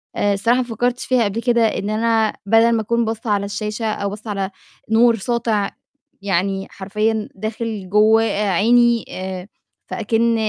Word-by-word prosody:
آآ 205 0 +1
الصراحة 230 +5 +2
ما 255 - +1
فكّرتش 245 +1 -2
فيها 255 -3 +2
قبل 210 +3 -2
كده 240 -1 +2
إن 205 -1 -1
أنا 220 0 +1
بَدَل 225 +3 +4
ما 225 -1 +1
أكون 235 +2 0
باصّة 225 0 -4
على 200 -1 +1
الشاشة 215 +2 -4
أو 210 -2 -1
باصّة 215 +2 -8
على 195 -1 -2 0.4
نور 230 +1 +5
ساطع 220 -2 0 0.5
يعني 195 0 -1
حرفيًا 215 +2 -2
داخل 215 -1 -4
جوّه 215 +2 +5
عيني، 225 +3 +2
آآ 185 0 -6 0.4
فأكِن 230 0 +1
220 Hz, 155 wpm, -20 LUFS, 200-230 Hz, 0.5 s, نور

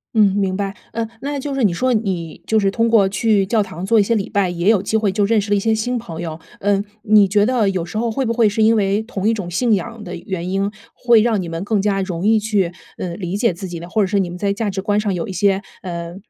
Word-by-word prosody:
嗯， 205 -3 +4
明 190 -2 0
白。 200 0 -3 0.2
呃， 230 -1 -2
那 285 +1 -3
就 275 0 -4
是 270 - 0
你 200 - +4
说 255 +8 +1
你 185 -7 -2
就 220 0 +2
是 195 -1 +2
通 230 +3 +1
过 215 -4 +5
去 200 0 +2
教 215 +1 +1
堂 180 -1 -7
做 225 +3 +3
一 - - +5
些 230 - 0
礼 200 -3 -2
拜， 200 -3 +1
也 175 +3 0
有 205 -4 +4
机 220 +2 0
会 210 -2 +1
就 205 +1 0
认 220 +2 +3
识 205 0 -4
了 205 - +3
一 - - +2
些 225 +2 +1
新 245 +3 -1
朋 175 -8 -7
友。 160 -2 -5 0.2
嗯， 200 0 +1 0.2
你 210 -2 +5
觉 205 +1 +3
得 235 -5 +2
有 180 -3 -2
时 175 - -6
候， 230 0 0
会 265 +4 -1
不 230 - 0
会 225 -3 +3
是 220 +2 -1
因 225 +1 +5
为 200 0 +1
同 210 -3 -3
一 225 - +3
种 195 -5 -4
信 225 +6 +1
仰 230 +3 -3
的 180 -2 -6
原 180 0 -5
因， 195 +1 0 0.2
会 235 -3 +4
让 225 -4 +1
你 175 - -5
们 165 +2 -4
更 205 -1 0
加 195 -1 +1
容 185 0 -2
易 220 0 +4
去， 205 -5 0 0.2
嗯， 175 -1 -5
理 180 +3 -2
解 230 -3 +2
自 185 +3 -7
己 170 -1 -6
呢？ 170 - -8
或 215 +3 +2
者 190 - 0
是 200 +1 +1
你 180 -2 0
们 175 - -7
在 200 +1 0
价 205 +1 -1
值 190 0 -3
观 205 +1 +1
上 210 -2 -1
有 170 -2 -3
一 - - -3
些， 195 +1 +1 0.2
呃， 170 -2 -6
205 Hz, 315 characters per minute, -19 LUFS, 190-220 Hz, 0.2 s, 过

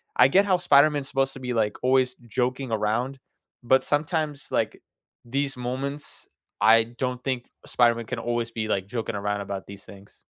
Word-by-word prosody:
I 125 - +6
get 195 +7 +4
how 190 -2 +3
Spider-Man's 145 -4 +4
supposed 135 0 0
to 135 - -10
be, 125 -1 -3
like, 110 -3 0
always 130 0 +3
joking 125 +2 -2
around, 115 +5 -1 0.4
but 130 +2 +3
sometimes, 150 -1 -1
like, - - -1 0.4
these 135 +2 -2
moments, 135 +4 -5 0.3
I 115 +1 +7
don't 125 -1 -2
think 130 -3 -2 0.2
Spider-Man 115 -1 +2
can 125 0 -4
always 120 0 -2
be, 110 -1 -3
like, 95 -2 -1
joking 115 -1 -4
around 100 0 -2
about 100 -1 -6
these 100 0 -10
things. 100 +1 -15
125 Hz, 170 wpm, -25 LUFS, 115-135 Hz, 0.4 s, I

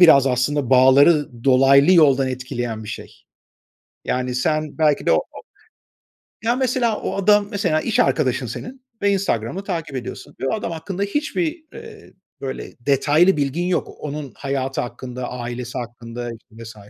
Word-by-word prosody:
biraz 140 -6 +7
aslında 130 +1 0
bağları 130 0 +4
dolaylı 135 +4 +5
yoldan 140 -6 +5
etkileyen 120 -3 -4
bir - - -9
şey. - - -9 0.8
Yani, 125 0 -2
sen 155 +4 -1
belki 150 -2 +2
de - - +4
o - - +5
o - - -5 1.0
Ya 235 +2 +2
mesela, 250 -4 0
o - - -3
adam, 205 +1 +3
mesela, 155 -6 0
iş 225 - -1
arkadaşın 130 -3 +1
senin 255 - -7 0.2
ve 200 0 +3
Instagram'ı 185 - -1
takip 165 -7 -4
ediyorsun 125 -2 -7
ve 135 - -1
o - - 0
adam 205 -5 -4
hakkında 180 +4 -4
hiçbir, 310 - -2
eee, 450 -2 -12 0.3
böyle 135 -1 -6
detaylı 145 +7 +3
bilgin 145 +5 -1
yok. 180 - 0
Onun 145 -2 -6
hayatı 135 -1 -2
hakkında, 125 0 -6
ailesi 120 0 -6
hakkında 120 0 -6
işte 115 +1 -13 0.2
vs. 115 0 -10
140 Hz, 155 wpm, -21 LUFS, 125-185 Hz, 1.0 s, biraz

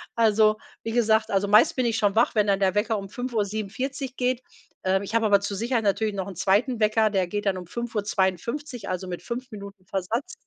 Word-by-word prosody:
Also, 215 -1 +4 0.3
wie 225 - -3
gesagt, 220 -2 +2
also, 195 +1 +1
meist 210 +3 +5
bin 255 -2 +1
ich 225 -1 +1
schon 205 -2 +1
wach, 230 +1 +3
wenn 210 -1 +3
dann 195 -1 +2
der 190 -2 +2
Wecker 215 +1 +1
um 195 -1 -7
5:47 245 +3 -3
geht. 250 0 0 0.4
Ähm, 190 +1 +1
ich 210 +3 -5
habe 230 -1 +3
aber 200 -1 +5
zur 200 0 -3
Sicherheit 230 +2 0
natürlich 210 +1 +1
noch 190 -1 -3
'n 190 - -7
2. 210 - +1
Wecker, 215 0 +3
der 190 -3 0
geht 205 +3 -3
dann 190 -1 +1
um 180 - -7
5:52 225 - -2
Uhr, - - -6
also 185 +1 -4
mit 175 -1 -6
5 250 +2 -5
Minuten 200 -2 -10
Versatz 220 - -3
215 Hz, 220 wpm, -25 LUFS, 195-235 Hz, 0.4 s, meist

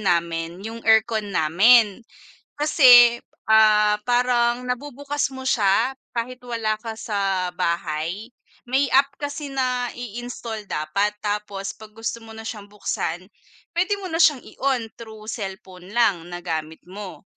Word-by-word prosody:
namin 170 -3 0
yung 225 +1 -6
aircon 220 -1 +3
namin. 200 +6 +4 0.6
Kasi, 245 -6 +7 0.3
ah, 215 -1 +5
parang 245 0 +1
nabubukas 285 +2 -3
mo 260 0 -4
siya 220 +4 +2 0.2
kahit 250 +1 -5
wala 230 -3 -1
ka 225 0 -7
sa 195 -4 -1
bahay, 170 +3 -2 0.4
may 265 +3 +2
app 275 +1 +5
kasi 290 0 -5
na 255 -2 -1
i-install 235 -2 -7
dapat. 200 +8 -1
Tapos 205 -1 -3
pag 220 - -13
gusto 225 +1 -4
mo 225 0 -12
na 225 - -9
siyang 210 -2 -7
buksan 185 -4 -3 0.5
pwede 365 +4 +1
mo 390 - -7
na 325 - -1
siyang 300 -6 +4
i-on 265 -4 -2
through 220 -2 -10
cellphone 190 -4 -7
lang 210 -6 +2
na 175 - -5
gamit 160 -2 -4
mo. 190 +2 -9
220 Hz, 135 wpm, -23 LUFS, 195-250 Hz, 0.6 s, Kasi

